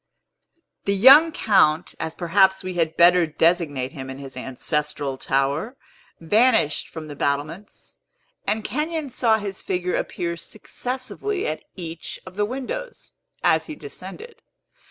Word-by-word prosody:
The 200 - +2
young 275 +10 +8
Count 185 - +3
as 160 - -4
perhaps 190 +2 +3
we 185 0 -4
had 165 -2 -1
better 175 0 +6
designate 155 -5 +1
him 135 -4 -8
in 130 - -7
his 135 -1 -10
ancestral 140 +2 -3
tower 140 - -1 0.4
vanished 215 - +3
from 160 -2 -8
the 145 - -8
battlements; 145 +8 -4 0.5
and 215 0 0
Kenyon 300 +4 -2
saw 230 -2 +2
his 200 -3 -5
figure 180 -1 -2
appear 170 -1 -3
successively 255 - -4
at 155 - -3
each 165 -3 -7
of 185 0 -11
the 205 +1 +1
windows, 275 - -6 0.3
as - - +3
he - - -6
descended. 460 +2 -10
180 Hz, 135 wpm, -23 LUFS, 155-225 Hz, 0.5 s, young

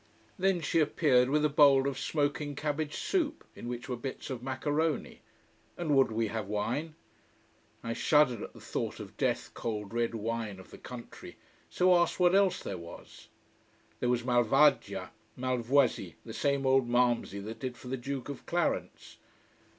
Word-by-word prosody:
Then 190 -2 +2
she 165 +2 +1
appeared 130 -5 +3
with 150 +2 +2
a - - +6
bowl 140 -2 +5
of 135 -1 -3
smoking 145 0 -1
cabbage 150 +1 -2
soup, 320 -6 -1
in - - -8
which 120 +1 -5
were 125 - -2
bits 130 +3 -6
of 125 -3 -4
macaroni: 145 +5 -1 0.6
and 155 -4 +1
would 135 -3 +4
we 110 0 0
have 110 -2 -4
wine? 145 +10 -2 0.9
I 115 - -2
shuddered 135 -2 +3
at - - -7
the - - -13
thought - - -4
of - - -9
death - - -1
cold 105 -2 -4
red 120 0 0
wine 110 -2 -3
of 95 - -14
the - - -11
country, 125 -2 -10 0.3
so 180 0 +4
asked 175 +1 +2
what 180 0 +5
else 195 -2 +3
there 95 - -5
was. 85 0 -12 0.7
There 120 - 0
was 120 -1 +1
malvagia 125 +4 +3 0.3
malvoisie, 125 -6 +1
the 110 - -7
same 140 +1 0
old 130 -2 +3
malmsey 120 -4 +2
that 110 +2 -7
did 125 0 -5
for - - -12
the 130 - -2
Duke 135 0 -5
of 140 -2 -7
Clarence. 175 0 -2
130 Hz, 165 wpm, -30 LUFS, 120-150 Hz, 0.9 s, a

